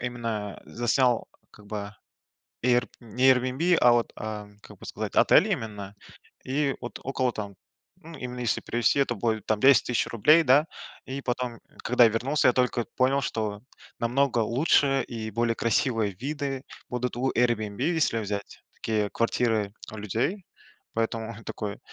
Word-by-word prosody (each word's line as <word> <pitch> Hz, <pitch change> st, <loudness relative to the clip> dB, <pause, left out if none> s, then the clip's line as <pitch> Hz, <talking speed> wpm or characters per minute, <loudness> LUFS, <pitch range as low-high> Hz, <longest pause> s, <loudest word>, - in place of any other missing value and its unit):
именно, 115 Hz, -4 st, -4 dB
э, -, -, -16 dB
заснял, 120 Hz, 0 st, +1 dB, 0.2 s
как 105 Hz, -, -17 dB
бы, 105 Hz, -1 st, -5 dB, 0.7 s
эйрб 125 Hz, 0 st, +2 dB
не 120 Hz, +2 st, -1 dB
"Эйрбиэнби", 130 Hz, +7 st, +3 dB
а, 120 Hz, -, +6 dB
вот, 120 Hz, -1 st, +1 dB
э, 105 Hz, -1 st, -6 dB
как -, -, -14 dB
бы -, -, -13 dB
сказать, -, -, -5 dB
отель -, -, +5 dB
именно, 105 Hz, -3 st, -4 dB, 0.5 s
и 140 Hz, +1 st, 0 dB
вот 120 Hz, -3 st, -7 dB
около, 130 Hz, -2 st, 0 dB
там, 100 Hz, -2 st, -6 dB, 0.4 s
ну, 165 Hz, -3 st, -12 dB
именно 125 Hz, 0 st, -6 dB
если 120 Hz, -3 st, 0 dB
привезти, 120 Hz, +4 st, +2 dB
то 120 Hz, -, -3 dB
будет 110 Hz, -1 st, -1 dB
там 110 Hz, -1 st, 0 dB
10 135 Hz, +3 st, +6 dB
тыщ 120 Hz, -, 0 dB
рублей, 150 Hz, +9 st, +5 dB
да. 140 Hz, +2 st, +5 dB, 0.4 s
И 135 Hz, +1 st, -5 dB
потом, 125 Hz, -2 st, -3 dB, 0.2 s
когда 125 Hz, -1 st, +5 dB
вернулся, 125 Hz, +7 st, +1 dB
я -, -, +2 dB
только 125 Hz, -2 st, +1 dB
понял, 135 Hz, +2 st, +3 dB
что 105 Hz, -5 st, -3 dB, 0.4 s
намного 125 Hz, +1 st, +1 dB
лучше 135 Hz, +4 st, +2 dB
и 110 Hz, -2 st, -5 dB
более 115 Hz, +1 st, 0 dB
красивые 115 Hz, -2 st, +1 dB
виды 135 Hz, +4 st, -4 dB, 0.3 s
будут 125 Hz, -1 st, -3 dB
у 130 Hz, +2 st, 0 dB
"Эйрбиэнби", 115 Hz, -2 st, 0 dB
если 160 Hz, -7 st, +1 dB
взять 100 Hz, -1 st, -5 dB
такие 105 Hz, -2 st, -1 dB
квартиры 110 Hz, -3 st, 0 dB, 0.2 s
у 110 Hz, -, -8 dB
людей, 120 Hz, -, -2 dB, 0.5 s
поэтому 115 Hz, 0 st, -2 dB
такой: 100 Hz, -1 st, -5 dB
120 Hz, 155 wpm, -26 LUFS, 110-130 Hz, 0.7 s, а